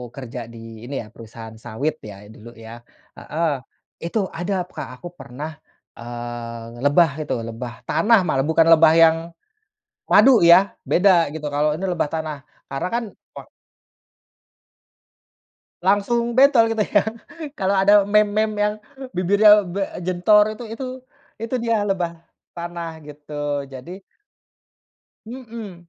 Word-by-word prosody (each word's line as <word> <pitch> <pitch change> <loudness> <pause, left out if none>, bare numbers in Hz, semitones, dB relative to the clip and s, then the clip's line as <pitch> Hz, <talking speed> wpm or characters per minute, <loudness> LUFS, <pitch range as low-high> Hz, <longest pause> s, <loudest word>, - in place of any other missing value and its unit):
kerja 125 -3 -8
di 115 0 -11
ini 140 - -5
ya - - -14
perusahaan 115 0 -11
sawit 135 +8 -4
ya 105 -1 -11
dulu 110 +1 -13
ya, 115 +1 -11 0.3
heeh, 155 -4 -3 0.4
itu 170 +6 -2
ada 180 +1 -2
Kak 175 - -8
aku 175 - -9
pernah, 155 -1 -8 0.4
eee, 120 0 -8
lebah 155 +2 +4
itu - - -2
lebah 115 +1 -7
tanah 225 0 +3
malah 135 -5 +1
bukan 160 0 +4
lebah 160 -1 +6
yang 165 -1 +6 0.9
madu 240 +3 +6
ya 185 +4 +7 0.2
beda 175 -5 +3
gitu, 150 -2 -5
kalau 150 +1 +1
ini 160 - -7
lebah 180 -5 -1
tanah 155 -2 -3 0.3
karena 135 +6 -3
kan 235 0 -1 0.3
wak - - -11 2.3
Langsung 235 +5 +1
bentol 260 -5 +5
gitu 220 -2 0
ya, 205 - +2 0.6
kalau 195 0 +1
ada 200 +1 +5
meme 210 0 +3 0.2
meme 215 -1 -6
yang 210 0 +1 0.4
bibirnya 205 +3 +5
be 185 +3 -3 0.2
jentor 210 +4 +3
itu 240 - -9
itu 230 +4 -6 0.6
itu 230 +2 -4
dia 230 -2 0
lebah 180 -4 -1 0.4
tanah 170 -2 -7
gitu, 145 -1 -5
jadi 135 +8 -9 1.3
Mhm. 225 -8 -10
170 Hz, 130 wpm, -21 LUFS, 135-205 Hz, 2.3 s, ya